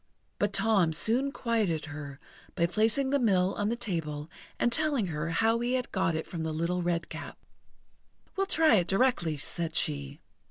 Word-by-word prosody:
But - - +1
Tom 195 -8 +3
soon 235 - +1
quieted 215 - 0
her 145 -2 -8 0.4
by 170 - +2
placing 220 +9 +1
the 285 - +3
mill 190 -6 +3
on 205 0 -1
the 235 - 0
table 160 -8 -4 0.3
and 240 - +2
telling 290 -5 +1
her 150 +2 -2
how 225 +7 +2
he 240 +1 -1
had 250 -1 -2
got 165 -4 +1
it 160 - -2
from 170 - -6
the 160 0 -2
Little 170 +3 -1
Redcap. 170 -1 -3 1.0
"We'll 390 0 0
try 315 - +5
it 175 -2 +1
directly," 195 - +1
said 165 +3 -3
she. 70 - -1
185 Hz, 170 wpm, -29 LUFS, 160-235 Hz, 1.0 s, try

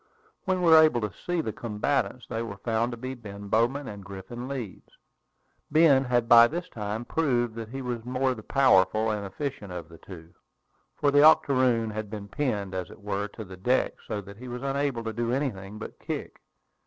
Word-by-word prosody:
When 185 -1 0
we 170 - +5
were 160 0 +10
able 155 -6 +4
to 105 -3 -3
see 175 - -2
the 110 - -4
combatants, 120 +4 -1
they 115 -1 -4
were 115 -4 -6
found 115 +3 0
to 120 - -6
be 130 +3 -5
Ben 100 -4 -9
Bowman 125 +6 +1
and 100 -2 -8
Griffin 100 +6 -8
Leeds. 125 -8 -6 0.8
Ben 145 -3 +5
had 120 -2 +1
by 120 0 +9
this 175 +6 -4
time 105 -1 -4
proved 120 -8 0
that 115 -1 -7
he 135 +2 -6
was 120 -2 -3
the 120 - -9
more 130 +1 +1
powerful 110 -3 +3
and 105 -1 -3
efficient 105 0 -5
of 85 -2 -7
the 85 -1 -14
two, 85 -3 -12 0.6
for 145 - +2
the 145 0 +5
octoroon 130 -7 +4
had 105 -1 -5
been 105 -1 -7
pinned, 105 -6 -2
as 95 -1 -4
it - - -13
were, 100 0 -2
to 110 +2 -9
the 95 -1 -11
deck, 125 +8 +1
so 105 -2 -3
that 100 +1 -12
he 125 +3 -9
was 125 +1 -6
unable 140 -3 -1
to 110 -1 -4
do 120 +1 -1
anything 110 -7 -3
but - - -9
kick. - - -6
115 Hz, 205 wpm, -27 LUFS, 105-135 Hz, 0.8 s, were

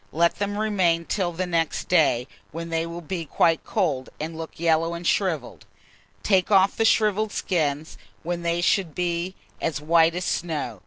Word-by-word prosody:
Let 170 +4 +1
them 205 0 -2
remain 185 -6 +1
till 185 -2 -1
the 180 +2 -3
next 165 -2 -1
day, 145 -8 +3 0.2
when 165 +2 -6
they 165 0 -1
will 170 +1 -7
be 175 0 -3
quite 165 +1 +2
cold, 150 - -1
and 160 +2 -4
look 160 0 -8
yellow 165 0 +2
and 170 +1 -7
shrivelled; 165 -10 -1 0.6
take 190 -3 +2
off 195 -1 +4
the 225 - +1
shrivelled 215 -1 +2
skins, 155 -4 -2 0.2
when 175 +1 -3
they 170 0 0
should 175 -3 +1
be 175 +1 -2 0.3
as 155 -3 -1
white 165 +2 +3
as 180 0 -3
snow. 150 - -2
170 Hz, 170 wpm, -24 LUFS, 160-185 Hz, 0.6 s, off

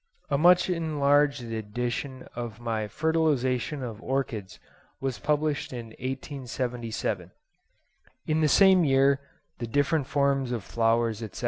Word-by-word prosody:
A 140 - +3
much 180 +2 +6
enlarged 145 -5 +2
edition 120 +4 -4
of 120 -2 -5
my 110 -2 -2
'Fertilisation 150 -1 0
of 115 -3 -6
Orchids' 120 -8 -3 0.4
was 130 -5 -3
published 150 +1 0
in 120 -2 -6
1877. 125 - -3 1.0
In 155 0 +1
this 155 -2 +3
same 190 -2 +6
year 135 -1 +4 0.4
'The 120 - -3
Different 145 +3 +1
Forms 140 -2 +1
of 115 -5 -3
Flowers, 115 0 +1
etc. 110 -3 -7
130 Hz, 120 wpm, -27 LUFS, 115-145 Hz, 1.0 s, much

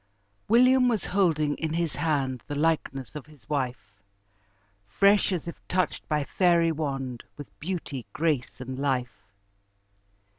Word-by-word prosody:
William 250 +3 +5
was 225 -5 0
holding 160 -6 +2
in 160 -1 -2
his 170 -2 0
hand 135 -6 0
The 145 - -4
likeness 145 -5 0
of 150 -1 -8
his 150 -3 -19
wife! 125 -9 -3 0.9
Fresh, 200 - +4
as 175 -3 -2
if 170 - -7
touched 185 0 -1
by 150 -2 +1
fairy 170 +1 +3
wand, 135 -6 -3
With 145 - -11
beauty, 155 - -4
grace, 145 -2 -1
and 130 +1 -6
life. 130 -3 -1
150 Hz, 135 wpm, -27 LUFS, 135-170 Hz, 0.9 s, William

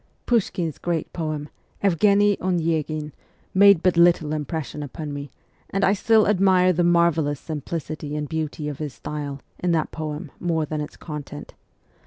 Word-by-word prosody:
Pushkin's 185 - 0
great 170 -3 -2
poem, 155 -3 -3 0.2
' - - -33
Evgheniy 200 +2 +4
Onyeghin,' 160 -4 -1 0.4
made 200 -3 +6
but 180 -2 +3
little 170 -3 +4
impression 150 0 -4
upon 145 +1 -6
me, 145 0 -6 0.4
and 195 +1 -1
I 195 - +5
still 220 +1 +4
admire 185 -2 +4
the 175 +1 +1
marvellous 170 -4 +2
simplicity 155 -1 -5
and 150 -1 -2
beauty 155 -1 -3
of 145 -2 -5
his 150 -3 -5
style 145 -2 -5 0.2
in 175 -1 +1
that 160 -2 0
poem 150 -2 -5
more 165 -3 0
than 155 0 -3
its 150 - -7
contents. 150 -2 -8
160 Hz, 155 wpm, -23 LUFS, 150-180 Hz, 0.4 s, made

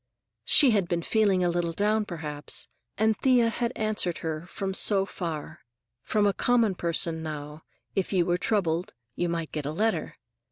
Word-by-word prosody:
She 275 -4 +6
had 200 -5 +2
been 170 -1 -1
feeling 200 -4 +2
a 175 - +2
little 170 -1 -1
down, 210 +3 +1
perhaps, 150 -5 -3 0.3
and 220 +1 +3
Thea 250 -3 +4
had 235 +1 -1
answered 215 -5 0
her, 160 +1 -3
from 195 +1 -4
so 195 0 +3
far. 165 -6 -5 0.4
From 210 +6 +1
a 200 - +3
common 235 -4 +3
person, 170 -1 -1
now, 150 -1 -6 0.3
if 195 - 0
you 180 -3 +2
were 175 0 +1
troubled, 180 - 0 0.2
you 175 +6 -1
might 165 -2 -3
get 150 -2 -3
a - - -2
letter. 220 +8 -1
180 Hz, 170 wpm, -27 LUFS, 165-215 Hz, 0.4 s, She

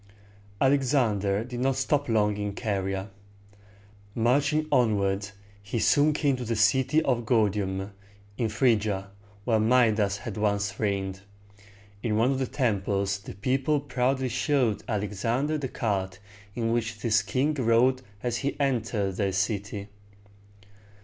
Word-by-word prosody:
Alexander 120 -7 +2
did 120 0 -6
not 135 +1 +1
stop 145 +1 0
long 105 -2 +2
in 105 -1 -4
Caria. 95 -2 -2 1.0
Marching 145 +6 +2
onward, 100 -4 +1 0.3
he 100 +4 -4
soon 145 +6 +4
came 145 -2 +1
to 125 - -5
the 115 0 -2
city 130 +8 +3
of 125 -4 0
Gor´di 105 -3 +2
um, 95 +1 -4 0.4
in 115 - 0
Phryg´i 110 -2 +2
a, 95 -1 -3 0.3
where 115 -3 +2
Mi´das 110 -3 +3
had 105 0 -7
once 100 -1 -1
reigned. 95 -2 -2 0.8
In 110 -2 0
one 120 +4 +3
of 135 - -1
the 130 - -1
temples 100 -5 0
the 100 - -10
people 135 +8 +1
proudly 130 -1 -1
showed 125 -4 +1
Alexander 115 +8 -1
the 135 - -3
cart 95 -6 -2 0.4
in 115 -1 -1
which 115 -2 -2
this 105 -3 +3
king 130 +10 0
rode 125 0 +3 0.2
as 120 -1 -1
he 140 +1 -3
entered 115 -8 -1
their 100 -2 0
city. 100 +1 -2
115 Hz, 135 wpm, -27 LUFS, 100-130 Hz, 1.0 s, soon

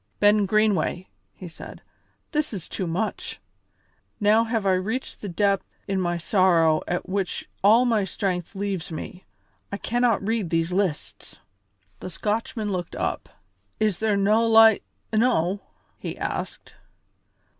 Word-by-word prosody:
"Ben 205 -1 +4
Greenway," 210 -3 +1 0.3
he 185 - -9
said, 165 - -11 0.5
"this 300 -4 -1
is 185 -5 -6
too 185 - -4
much! 185 +5 -3 0.8
Now 215 +2 +4
have 225 -2 -1
I 190 - +4
reached 215 +8 -3
the 205 - -5
depth 195 +2 +1 0.2
in 195 -1 0
my 175 -1 0
sorrow 170 -3 +3
at 175 - -2
which 190 0 -2 0.2
all 225 +5 +6
my 225 -4 +2
strength 190 -1 -3
leaves 195 -4 -3
me. 180 +3 -7 0.5
I 200 - -3
cannot 235 -3 +1
read 220 -6 0
these 165 +1 0
lists." 185 -5 -3 0.6
The - - -6
Scotchman 210 +2 -2
looked 180 -3 -4
up. - - -3 0.5
"Is 210 -4 +1
there 215 -2 +1
no' 215 +3 +3
light 225 -1 +7 0.3
enow!" 210 -5 +2 0.4
he - - -6
asked. - - -5
200 Hz, 135 wpm, -24 LUFS, 180-220 Hz, 0.8 s, light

